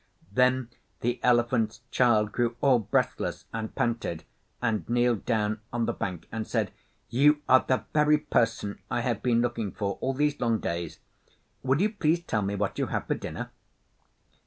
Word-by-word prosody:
Then 125 +1 +2 0.3
the 120 +1 0
Elephant's 120 -2 +2
Child 110 -4 +3
grew 120 0 0
all 130 -3 +4
breathless, 105 -2 -1
and 110 -1 -4
panted, 115 -8 -1 0.4
and 115 -3 -1
kneeled 120 -2 +2
down 110 -2 0
on 120 -1 0
the - - -1
bank 90 -4 -4
and 110 -1 -4
said, - - 0 0.4
'You 145 +4 +4
are 130 - +7
the 130 - +1
very 150 0 +5
person 115 -7 0
I 120 - 0
have 120 -3 -1
been 120 -2 +2
looking 115 -4 -1
for 100 -1 -3
all 135 0 -1
these 145 +1 +1
long 115 -2 +2
days. 85 -5 -4 0.6
Will 130 +2 +1
you 205 +3 +2
please 170 -5 +1
tell 110 -10 -1
me 100 0 -1
what 100 -1 -2
you - - 0
have - - -2
for - - 0
dinner? - - -6
120 Hz, 170 wpm, -27 LUFS, 110-130 Hz, 0.6 s, are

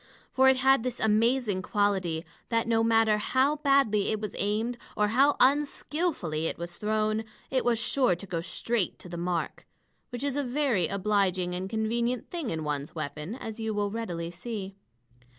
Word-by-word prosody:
For 265 0 +5
it 265 - +4
had 265 -1 +4
this 250 0 -3
amazing 220 -1 +2
quality, 190 -5 0 0.2
that 230 -1 +1
no 225 -1 +3
matter 225 -2 +3
how 265 +7 +2
badly 275 -8 +3
it 215 - 0
was 210 -2 -5
aimed, 220 +4 -1 0.2
or 210 0 +3
how 275 +6 +4
unskillfully 280 - +1
it - - -4
was 170 +1 -6
thrown, 215 +1 0 0.3
it 260 -1 +1
was 240 -1 +2
sure 240 -3 +2
to 180 - -9
go 170 -3 -3
straight 225 +3 -2
to 180 - -11
the 175 - -6
mark 170 0 -3 0.4
which 245 +1 -5
is 280 -2 -1
a 285 - 0
very 250 - +1
obliging 190 -3 0
and 185 +2 -4
convenient 235 +3 -1
thing 335 -7 -3
in 160 -1 -3
one's 145 0 -3
weapon, 150 +5 -5
as 225 -4 -7
you 220 -1 -2
will 205 -1 0
readily 175 -7 -4
see. 195 +1 -6
215 Hz, 175 wpm, -28 LUFS, 185-245 Hz, 0.4 s, For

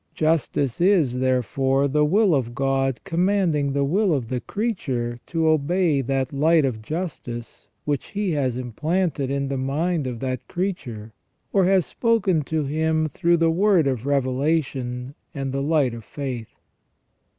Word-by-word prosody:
Justice, 155 -4 0
is, 165 -10 +3
therefore, 130 +2 +1
the 150 +2 +2
will 190 +5 +3
of 120 -4 -1
God 135 -1 0
commanding 175 -6 +1
the 140 0 +1
will 180 +4 +2
of 120 -5 -3
the 130 - -1
creature 130 - -3
to 165 -1 0
obey 155 0 +2
that 135 +1 -1
light 155 +2 +4
of 115 -5 -2
justice 130 -5 -6 0.2
which 145 -2 -1
He 205 -2 -2
has 130 -5 0
implanted 150 - -1
in 140 0 -1
the 135 -1 -2
mind 150 +3 -1
of 120 -2 -5
that 130 -1 -4
creature, 125 - -4 0.4
or 195 -2 +4
has 190 -1 +3
spoken 210 -8 +1
to 160 0 -1
him 155 +2 0
through 170 +2 +2
the 165 0 +3
word 185 -1 +3
of 130 -2 -1
revelation 130 -2 -1 0.2
and 135 -1 -3
the 135 +1 -2
light 145 -4 +2
of 115 -1 -8
faith. 125 -2 -5
140 Hz, 150 wpm, -23 LUFS, 130-170 Hz, 0.4 s, light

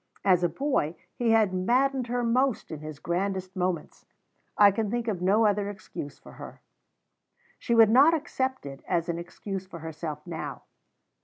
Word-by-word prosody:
As 180 -3 +4
a 175 - +3
boy, 265 - -1 0.2
he 240 -2 -1
had 220 -4 +4
maddened 250 +7 +1
her 245 +1 -1
most 250 -1 +1
in 155 - -5
his 155 -1 -8
grandest 185 +3 -2
moments. 180 -3 -3 0.5
I 205 -1 +7
can 210 +1 -2
think 235 +1 -2
of 195 -5 -2
no 205 +5 +3
other 205 -1 +1
excuse 145 -8 -8
for - - -15
her. - - -11 1.0
She 235 - 0
would 225 -2 +7
not 285 +7 +6
accept 265 - -3
it 135 -1 -9
as 175 -1 0
an 170 0 -2
excuse 190 +2 -6
for 185 - -9
herself 155 -2 -6
now. 165 -2 -6
195 Hz, 170 wpm, -27 LUFS, 170-235 Hz, 1.0 s, I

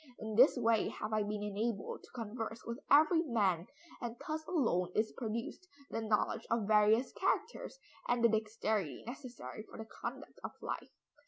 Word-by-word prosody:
In 220 0 -5
this 255 +5 +7
way 230 -2 +3
have 215 +1 -4
I 215 - +3
been 205 0 -2
enabled 210 +1 -2
to - - -16
converse 225 -1 -4
with 235 +2 -4
every 315 +3 +7
man, 200 - +1 0.3
and 240 -2 -3
thus 310 0 -2
alone 230 - +1
is 215 0 +2
produced 235 +9 -4 0.2
the 225 - -1
knowledge 220 +1 0
of 230 -2 +1
various 215 +3 +5
characters, - - -1 0.3
and 240 -1 +2
the 235 - +7
dexterity 215 - 0
necessary 245 -2 -7
for - - -10
the 220 - -6
conduct - - -7
of - - -5
life." - - -4
225 Hz, 165 wpm, -35 LUFS, 215-245 Hz, 0.3 s, this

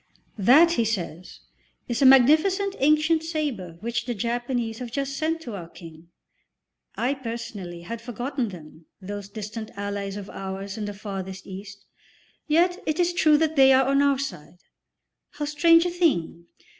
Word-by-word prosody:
"That," 285 - +6
he 235 - +1
says, 185 -5 -4 0.5
"is 240 +1 -2
a 270 - +7
magnificent 315 +10 +5
ancient 305 +3 +3
sabre 290 - -4
which 235 +1 -2
the 240 - -2
Japanese 235 +1 -2
have 245 -2 -6
just 275 +1 -3
sent 325 +3 -1
to 240 -8 -7
our 175 -4 -7
King." 165 -2 -13 0.9
I, 255 +3 0
personally, 230 -9 -7
had 230 +6 -7
forgotten 245 +1 -3
them, 160 -3 -13
those 200 +1 -7
distant 215 +1 -7
allies 200 0 -4
of 200 -1 -7
ours 195 +1 -6
in 215 -2 -4
the 205 0 -6
Farthest 195 -2 -6
East. 200 +1 -10 0.6
Yet 350 +4 +2
it 310 +1 -1
is 350 0 +2
true 310 -3 +4
that 315 0 0
they 270 -1 +7
are 260 0 +4
on 275 +1 +3
our 280 -1 +3
side; 260 - -6 0.8
how 295 - -4
strange 330 +3 +4
a 355 - 0
thing! 175 - 0
235 Hz, 160 wpm, -25 LUFS, 200-300 Hz, 0.9 s, a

